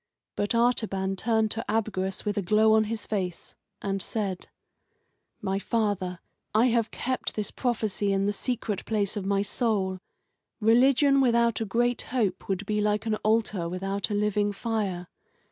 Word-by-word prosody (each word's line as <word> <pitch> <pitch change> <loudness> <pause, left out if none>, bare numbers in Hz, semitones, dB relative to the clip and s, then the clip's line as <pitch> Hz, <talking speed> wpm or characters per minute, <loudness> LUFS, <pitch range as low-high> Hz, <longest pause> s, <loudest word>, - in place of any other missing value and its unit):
But 205 +3 0
Artaban 220 -5 +1
turned 220 +1 +1
to 225 - 0
Abgarus 195 -4 -1
with 205 -1 -1
a 205 - 0
glow 215 +3 +4
on 220 0 +4
his 220 0 -4
face, 185 -5 -3 0.3
and 195 -1 -1
said: 195 -1 -3 1.0
"My 195 0 0
father, 200 -5 -1 0.4
I 235 +4 +5
have 230 -1 +1
kept 255 0 -3
this 210 -1 -3
prophecy 215 -5 -1
in 195 0 +1
the 205 - +1
secret 220 -2 -2
place 210 -2 0
of 200 -2 -3
my 200 0 +2
soul. 200 -3 0 0.6
Religion 265 +5 +4
without 235 -2 +2
a - - 0
great 240 +4 +1
hope 225 -7 -2
would 195 +1 -1
be 210 +1 0
like 210 +1 0
an 220 - 0
altar 215 -6 0
without 195 +3 -2
a 205 - -1
living 205 0 +1
fire. 200 -5 -2
210 Hz, 160 wpm, -27 LUFS, 195-225 Hz, 1.0 s, I